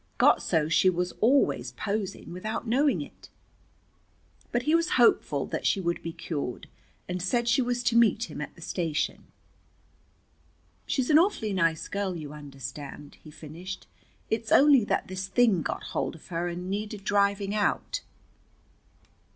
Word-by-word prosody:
Got - - +5
so 160 -4 +1
she 160 +4 +4
was 180 0 -1
always 265 +5 +3
posing, 200 -4 -4
without 215 +7 -4
knowing 270 +5 +2
it." - - -15 1.2
But 240 +1 0
he 305 - +1
was 335 +1 +2
hopeful 240 -2 +3
that - - -2
she 200 - +2
would 170 -2 -1
be 165 - -5
cured, 145 -6 -5 0.4
and 180 0 -3
said 235 +6 0
she 240 +2 +4
was 245 0 -1
to 235 - +1
meet 230 -1 +4
him 150 -6 -6
at - - -7
the 170 - -12
station. 160 -4 -2 1.6
"She's 265 +1 0
an 305 - +8
awfully 330 - +1
nice 165 -4 +1
girl, 200 -2 -2
you 150 -3 -7
understand," 145 0 -9
he 155 - -12
finished. 165 +5 -8 0.5
"It's 220 0 -1
only 280 -4 +7
that - - -1
this 185 +1 -4
thing 220 -4 +3
got - - -3
hold - - -1
of 160 - -16
her 170 0 -2
and 175 +1 -5
needed 205 +1 -4
driving 200 0 +1
out." 215 - 0
195 Hz, 155 wpm, -27 LUFS, 165-235 Hz, 1.6 s, an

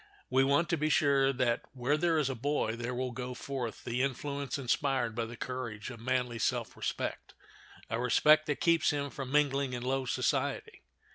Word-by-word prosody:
We 130 +1 +4
want 140 +5 +3
to 170 - +1
be 155 +1 0
sure 140 -3 +4
that 125 -3 +1
where 130 +3 +1
there 165 +1 +2
is 150 -4 +2
a 135 - -1
boy 130 -2 -1
there 120 +1 -4
will 130 0 -2
go 125 +1 -5
forth 125 -3 -5
the 120 +1 -1
influence 140 0 -2
inspired 130 -2 0
by 115 0 -2
the 120 +1 -9
courage 125 -3 -5
of 120 - -9
manly 125 -1 -1
self - - -1
respect—a 115 - -6
respect 155 +5 +5
that 150 - -1
keeps 170 -2 +3
him 145 -2 -1
from 135 +1 -6
mingling 140 -2 +2
in 120 -1 -4
low 130 +1 0
society. - - -1
130 Hz, 185 wpm, -31 LUFS, 120-145 Hz, -, respect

